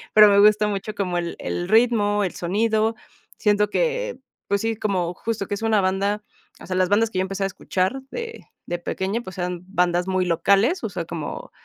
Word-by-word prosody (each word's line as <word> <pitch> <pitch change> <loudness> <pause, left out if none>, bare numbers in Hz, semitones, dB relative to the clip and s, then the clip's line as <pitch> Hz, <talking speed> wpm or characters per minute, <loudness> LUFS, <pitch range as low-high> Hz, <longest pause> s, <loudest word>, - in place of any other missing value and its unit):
pero 210 -1 +10
me 200 0 +5
gusta 210 0 +5
mucho 205 +1 -3
como 180 -3 -1
el 170 -1 -4
el 175 +1 -3
ritmo, 215 -3 +3
el 185 - -2
sonido, 220 +4 +1 0.5
siento 210 -1 +2
que, - - -1 0.3
pues, 200 0 +1
sí, 225 0 -1
como 185 -5 -1
justo 225 -3 -3
que - - -3
es 210 - -8
una 220 -3 +3
banda, 200 +3 0 0.4
o - - -11
sea, 185 - -2
las 185 0 +2
bandas 220 +2 +3
que - - -4
yo - - +3
empezaba 195 +1 -2
a - - +1
escuchar 190 +9 -1
de 460 -1 -6 0.2
de 175 0 -3
pequeña, 195 +6 -2
pues, 185 -3 -10
eran 180 -1 -3
bandas 180 -1 +1
muy 185 -1 +1
locales, 200 - +2
o - - -1
sea, - - -4
como, - - -6
205 Hz, 205 wpm, -23 LUFS, 185-220 Hz, 0.5 s, pero